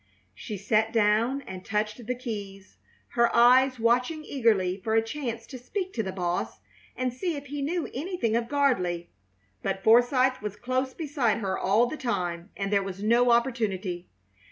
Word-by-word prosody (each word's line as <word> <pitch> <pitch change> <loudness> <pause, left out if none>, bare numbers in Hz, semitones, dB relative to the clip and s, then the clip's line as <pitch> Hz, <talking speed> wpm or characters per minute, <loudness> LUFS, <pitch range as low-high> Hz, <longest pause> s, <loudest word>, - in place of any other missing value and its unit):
She 205 - -6
sat 215 +3 +1
down 225 +5 +2
and 185 -4 -8
touched 215 +2 -2
the 250 - -1
keys, 205 -5 -7 0.3
her 235 -2 +3
eyes 255 +2 +5
watching 250 +7 +1
eagerly 200 -8 +1
for 220 0 0
a 225 - +5
chance 230 -2 -5
to 255 0 -9
speak 375 - -4
to 225 - -1
the 190 -3 -4
Boss 175 -2 -2 0.4
and 255 -1 -1
see 335 +6 -2
if 285 0 -7
he 285 +1 -5
knew 330 +4 -1
anything 275 - -1
of 235 0 0
Gardley; 185 -12 0 0.5
but 190 - -3
Forsythe 255 +3 +4
was 210 -1 -4
close 255 +2 -2
beside 280 -8 0
her 195 -4 -2
all 205 +6 +3
the 280 +6 -5
time, 180 -9 -3
and 195 0 -2
there 200 - +4
was 195 0 -6
no 240 +3 +4
opportunity. 215 -7 0
230 Hz, 170 wpm, -27 LUFS, 200-255 Hz, 0.5 s, eyes